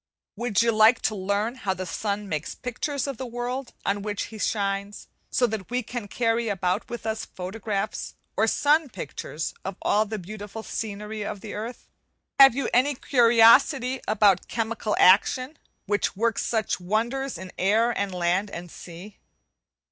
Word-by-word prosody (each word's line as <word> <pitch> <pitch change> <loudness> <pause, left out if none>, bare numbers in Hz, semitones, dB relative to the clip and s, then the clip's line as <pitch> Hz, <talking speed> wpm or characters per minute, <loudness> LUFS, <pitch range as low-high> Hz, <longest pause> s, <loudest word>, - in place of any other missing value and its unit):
Would 235 -3 +1
you 230 - +3
like 220 +2 +5
to 215 - +1
learn 200 +4 -1
how 200 -7 -2
the 185 - -5
sun 205 +3 -3
makes 155 -4 -3
pictures 275 +3 -3
of 275 -4 -4
the 260 - -5
world 245 +2 -4
on 200 +1 0
which 205 0 -3
he 215 - -8
shines, 200 -1 -2 0.2
so 250 - +2
that 215 -5 -4
we 250 +1 -1
can 230 -1 -6
carry 230 +1 0
about 185 0 -1
with 240 -2 -6
us 220 0 -2
photographs 195 +2 -4 0.2
or - - +2
sun 300 0 +3
pictures 155 - -5
of 195 0 -4
all 215 +1 +3
the 215 +1 -4
beautiful 210 +3 -8
scenery 210 0 -5
of 205 -1 -5
the 215 - -7
earth? 230 +4 -6 0.5
And 275 - +12
have 270 - +3
you 275 -3 -1
any 270 +3 +3
curiosity 250 +2 +5
about 210 -3 +3
'Chemical 225 -2 -2
action,' 255 +10 +4 0.3
which 205 0 0
works 230 +3 0
such 220 -4 -1
wonders 235 +7 -1
in 185 +1 -8
air, 220 +5 +3
and 200 -1 -1
land, 180 +3 0
and 175 -2 -8
sea? 180 +4 -11
215 Hz, 165 wpm, -25 LUFS, 200-240 Hz, 0.5 s, And